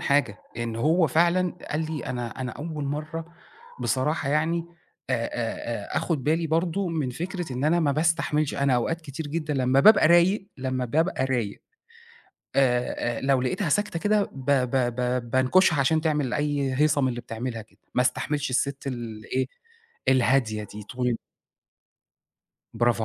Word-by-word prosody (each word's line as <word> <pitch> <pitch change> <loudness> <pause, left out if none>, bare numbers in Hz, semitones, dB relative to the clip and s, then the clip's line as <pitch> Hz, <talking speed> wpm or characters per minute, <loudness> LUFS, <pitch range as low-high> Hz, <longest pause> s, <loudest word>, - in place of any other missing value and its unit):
حاجة 140 -9 +1 0.2
إن 115 -1 -3
هو 160 +7 +3
فعلًا 175 +5 +2 0.2
قال 155 - 0
لي: 150 - -4
"أنا 120 0 -4
أنا 125 -1 -3
أول 150 0 -5
مرّة 155 +3 -4 0.6
بصراحة 140 +2 0
يعني 160 +3 +1 0.5
آآ - - +3
آآ - - -3
آآ، - - -3
أخد 145 -6 -1
بالي 160 +2 +1
برضه 170 +4 0
من 155 -6 -1
فكرة 175 +1 -4
إن 125 +3 -2
أنا 170 +3 +3
ما 145 -3 +2
باستحملش، 155 -1 +1
أنا 140 -2 +2
أوقات 165 +7 0
كتير 150 0 -6
جدًا 150 0 -2
لمّا 130 +1 +3
بابقى 195 -4 +7
رايق، 190 +4 +4
لمّا 130 -1 -2
بابقى 155 +2 +1
رايق 120 -6 -2 1.0
آآ، 125 -3 +1
لو 135 -1 +2
لقيتها 155 +7 -1
ساكتة 205 +2 0
كده 210 +2 +2
ب 135 -1 -9
ب 130 -3 +3 0.3
ب 125 -1 -1
بانكشها 145 +6 +4
عشان 155 +4 +3
تعمل 150 -5 0
أي 145 -2 0
هيصة 150 +1 +3
من 130 - +2
اللي 120 -1 -3
بتعملها 115 -1 -5
كده، 110 - -26 0.2
ما 125 - +4
استحملش 145 +2 -1
السِت 140 +2 -1
الإيه، 120 0 -3 0.6
الهادية 125 -4 +3
دي 105 0 -9
طول" 125 +2 -1 1.6
برافو 120 -1 +2
140 Hz, 155 wpm, -26 LUFS, 125-160 Hz, 1.6 s, بابقى